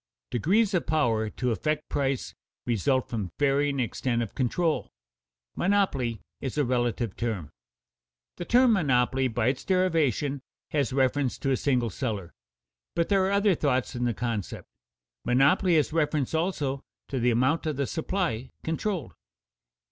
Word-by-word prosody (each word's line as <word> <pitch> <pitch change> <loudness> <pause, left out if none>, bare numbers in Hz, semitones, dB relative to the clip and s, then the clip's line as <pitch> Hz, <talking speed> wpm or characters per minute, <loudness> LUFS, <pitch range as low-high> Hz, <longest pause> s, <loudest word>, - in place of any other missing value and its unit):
Degrees 195 - +2
of 180 - 0
power 115 -8 +1
to 125 +3 -2
affect 150 +9 -1
price 135 -2 -1 0.3
result 125 +3 +1
from 105 -6 -3
varying 140 0 +2
extent 120 0 -1
of 110 - -7
control; 155 +6 0 0.7
monopoly 145 - +1 0.2
is 135 +2 -4
a 145 - +3
relative 120 -3 -1
term. 105 -10 -3 0.9
The 175 - -5
term 245 +2 +5
monopoly 130 - +2
by 120 0 +1
its 130 - -3
derivation 155 - +1 0.3
has 140 -5 +1
reference 130 0 +1
to 135 - -1
a - - +4
single 125 -5 +1
seller; 105 -7 -4 0.6
but 170 - +1
there 195 -2 +4
are - - 0
other 200 0 +3
thoughts 140 -6 0
in 120 0 -1
the 120 -2 0
concept. 115 -5 -3 0.6
Monopoly 145 +8 +3
has 155 0 +2
reference 150 -4 0
also 150 -5 -1 0.3
to 135 - -2
the 125 +1 +3
amount 130 +8 +2
of 155 - -1
the 140 +1 0
supply 155 - -2
controlled. 165 - -2
135 Hz, 145 wpm, -27 LUFS, 120-160 Hz, 0.9 s, term